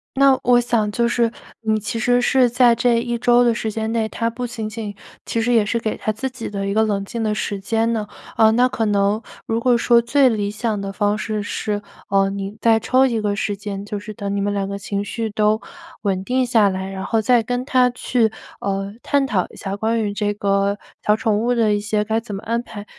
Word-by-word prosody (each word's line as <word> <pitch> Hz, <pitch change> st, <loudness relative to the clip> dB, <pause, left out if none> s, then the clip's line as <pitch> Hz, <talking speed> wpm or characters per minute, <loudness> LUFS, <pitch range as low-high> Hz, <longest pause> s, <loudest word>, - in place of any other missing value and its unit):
那 275 Hz, -1 st, +5 dB
我 245 Hz, 0 st, +5 dB
想 225 Hz, -3 st, 0 dB
就 235 Hz, +2 st, +1 dB
是， 235 Hz, -1 st, +1 dB, 0.3 s
你 220 Hz, -1 st, +1 dB
其 215 Hz, +2 st, -4 dB
实 245 Hz, +1 st, +3 dB
是 255 Hz, 0 st, +3 dB
在 245 Hz, 0 st, +5 dB
这 235 Hz, 0 st, +2 dB
1 240 Hz, 0 st, -2 dB
周 240 Hz, +1 st, +4 dB
的 240 Hz, -1 st, +3 dB
时 220 Hz, -1 st, -2 dB
间 220 Hz, +1 st, -3 dB
内， 225 Hz, -1 st, 0 dB
他 230 Hz, +1 st, -1 dB
不 245 Hz, +2 st, -5 dB
仅 230 Hz, -3 st, -5 dB
仅 215 Hz, -2 st, -6 dB, 0.3 s
其 230 Hz, -, -1 dB
实 245 Hz, +2 st, +1 dB
也 225 Hz, -3 st, +4 dB
是 230 Hz, +2 st, 0 dB
给 220 Hz, -1 st, -2 dB
他 215 Hz, -, -1 dB
自 265 Hz, +5 st, -4 dB
己 255 Hz, -2 st, -7 dB
的 195 Hz, -1 st, -3 dB
一 200 Hz, -, -1 dB
个 220 Hz, +1 st, +3 dB
冷 200 Hz, -2 st, -1 dB
静 230 Hz, +3 st, -4 dB
的 215 Hz, -1 st, 0 dB
时 205 Hz, -1 st, -3 dB
间 225 Hz, +4 st, 0 dB
呢， 215 Hz, -2 st, -2 dB, 0.3 s
呃， 220 Hz, 0 st, +6 dB
那 245 Hz, +2 st, +4 dB
可 225 Hz, -3 st, -2 dB
能 205 Hz, +1 st, +1 dB, 0.2 s
如 225 Hz, 0 st, -1 dB
果 245 Hz, 0 st, +3 dB
说 235 Hz, 0 st, +4 dB
最 265 Hz, +3 st, +3 dB
理 205 Hz, -3 st, -1 dB
想 215 Hz, 0 st, -2 dB
的 195 Hz, 0 st, -4 dB
方 205 Hz, +1 st, +1 dB
式 215 Hz, 0 st, -3 dB
是， 205 Hz, 0 st, -3 dB, 0.3 s
呃， 195 Hz, 0 st, +3 dB
你 200 Hz, +1 st, -5 dB
再 225 Hz, -1 st, +4 dB
抽 255 Hz, +4 st, +3 dB
一 230 Hz, -3 st, -1 dB
个 205 Hz, -1 st, 0 dB
时 205 Hz, 0 st, -2 dB
间 200 Hz, -1 st, -6 dB
就 205 Hz, 0 st, -4 dB
是 210 Hz, +1 st, -8 dB
等 200 Hz, 0 st, -4 dB
你 200 Hz, -, 0 dB
们 205 Hz, +1 st, 0 dB
2 200 Hz, -1 st, -1 dB
个 200 Hz, 0 st, -4 dB
情 200 Hz, 0 st, -3 dB
绪 225 Hz, +1 st, -3 dB
都 215 Hz, +1 st, +1 dB, 0.4 s
稳 190 Hz, -2 st, 0 dB
定 255 Hz, +2 st, +1 dB
下 230 Hz, -4 st, +4 dB
来， 190 Hz, 0 st, -4 dB
然 190 Hz, 0 st, -5 dB
后 225 Hz, -1 st, +1 dB
再 235 Hz, +1 st, +3 dB
跟 245 Hz, +2 st, -2 dB
他 255 Hz, -2 st, +3 dB
去， 240 Hz, -2 st, +1 dB, 0.3 s
呃， 195 Hz, 0 st, -2 dB
探 280 Hz, -1 st, +2 dB
讨 190 Hz, -7 st, 0 dB
一 -, -, -15 dB
下 195 Hz, 0 st, -5 dB
关 225 Hz, +2 st, 0 dB
于 205 Hz, -1 st, -2 dB
这 205 Hz, 0 st, -1 dB
个 200 Hz, 0 st, 0 dB, 0.3 s
小 210 Hz, -, +4 dB
宠 215 Hz, -1 st, 0 dB
物 240 Hz, +3 st, +1 dB
的 220 Hz, -3 st, +3 dB
一 205 Hz, -, +1 dB
些 210 Hz, 0 st, 0 dB
该 220 Hz, +1 st, 0 dB
怎 225 Hz, -3 st, -7 dB
么 195 Hz, -, -7 dB
安 230 Hz, +1 st, -1 dB
排。 205 Hz, -3 st, -9 dB
220 Hz, 255 characters per minute, -21 LUFS, 205-235 Hz, 0.4 s, 呃